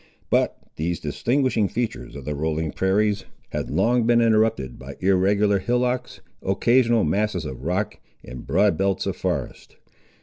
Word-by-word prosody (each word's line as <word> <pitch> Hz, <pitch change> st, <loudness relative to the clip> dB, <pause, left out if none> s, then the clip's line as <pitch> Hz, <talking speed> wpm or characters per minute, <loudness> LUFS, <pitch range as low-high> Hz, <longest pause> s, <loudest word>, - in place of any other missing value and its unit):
But -, -, +2 dB, 0.2 s
these 85 Hz, +2 st, -2 dB
distinguishing 125 Hz, -5 st, 0 dB
features 110 Hz, -, -4 dB
of 70 Hz, -2 st, -8 dB
the 75 Hz, -, -2 dB
rolling 80 Hz, +1 st, -2 dB
prairies 100 Hz, +4 st, +1 dB, 0.3 s
had -, -, -3 dB
long 120 Hz, 0 st, +2 dB
been 120 Hz, 0 st, +5 dB
interrupted 110 Hz, -, +2 dB
by 70 Hz, +2 st, -9 dB
irregular 100 Hz, +2 st, +3 dB
hillocks, 125 Hz, +3 st, -1 dB, 0.2 s
occasional 115 Hz, +3 st, +3 dB
masses 95 Hz, +1 st, 0 dB
of 65 Hz, -4 st, -6 dB
rock, 90 Hz, +8 st, -2 dB, 0.2 s
and 65 Hz, -1 st, -9 dB
broad 105 Hz, -2 st, +2 dB
belts 95 Hz, -1 st, +1 dB
of -, -, -2 dB
forest. -, -, -4 dB
100 Hz, 140 wpm, -23 LUFS, 80-115 Hz, 0.3 s, been